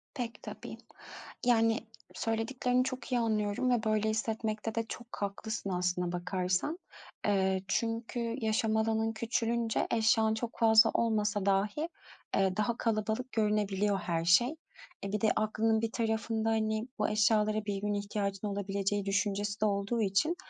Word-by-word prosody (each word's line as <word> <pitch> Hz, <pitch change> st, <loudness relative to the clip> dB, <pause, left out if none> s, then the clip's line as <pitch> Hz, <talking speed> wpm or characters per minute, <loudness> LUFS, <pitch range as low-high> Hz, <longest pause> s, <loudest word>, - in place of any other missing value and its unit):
Pek 240 Hz, -4 st, -5 dB
tabii. -, -, -8 dB, 0.7 s
Yani, 225 Hz, -1 st, +4 dB, 0.4 s
söylediklerini 245 Hz, +3 st, 0 dB
çok 260 Hz, 0 st, -5 dB
iyi 245 Hz, -, +2 dB
anlıyorum 215 Hz, +1 st, 0 dB
ve 235 Hz, -2 st, +2 dB
böyle 215 Hz, 0 st, +1 dB
hissetmekte 220 Hz, 0 st, -2 dB
de 230 Hz, -, +1 dB
çok 240 Hz, 0 st, -7 dB
haklısın 200 Hz, +1 st, -3 dB
aslına 180 Hz, -1 st, 0 dB
bakarsan. 180 Hz, -, -1 dB, 0.5 s
Eee, 190 Hz, -2 st, +2 dB
çünkü 230 Hz, +3 st, -1 dB, 0.2 s
yaşam 220 Hz, -1 st, +1 dB
alanın 220 Hz, 0 st, +1 dB
küçülünce 230 Hz, 0 st, 0 dB
eşyan 220 Hz, -1 st, +3 dB
çok 230 Hz, +1 st, -5 dB
fazla 220 Hz, -1 st, +6 dB
olmasa 210 Hz, -3 st, +1 dB
dahi, 205 Hz, +11 st, +1 dB, 0.5 s
eee, 190 Hz, -1 st, +2 dB
daha 230 Hz, +2 st, 0 dB
kalabalık 225 Hz, +3 st, -1 dB
görünebiliyor 210 Hz, -2 st, +1 dB
her 165 Hz, -2 st, -2 dB
şey. 240 Hz, -, +4 dB, 0.5 s
E, 195 Hz, -, -3 dB
bir 210 Hz, -, -1 dB
de 220 Hz, -, +4 dB
aklın 220 Hz, +1 st, +1 dB
bir 225 Hz, -, -1 dB
tarafında, 225 Hz, -1 st, -1 dB
hani, 220 Hz, +1 st, 0 dB
bu 210 Hz, -, +2 dB
eşyalara 215 Hz, 0 st, +2 dB
bir 200 Hz, -1 st, -2 dB
gün 210 Hz, 0 st, -1 dB
ihtiyacın 200 Hz, 0 st, -2 dB
olabileceği 200 Hz, 0 st, -1 dB
düşüncesi 205 Hz, +1 st, -1 dB
de -, -, +4 dB
olduğu 200 Hz, +3 st, 0 dB
için 215 Hz, -, +2 dB
215 Hz, 140 wpm, -31 LUFS, 200-225 Hz, 0.7 s, fazla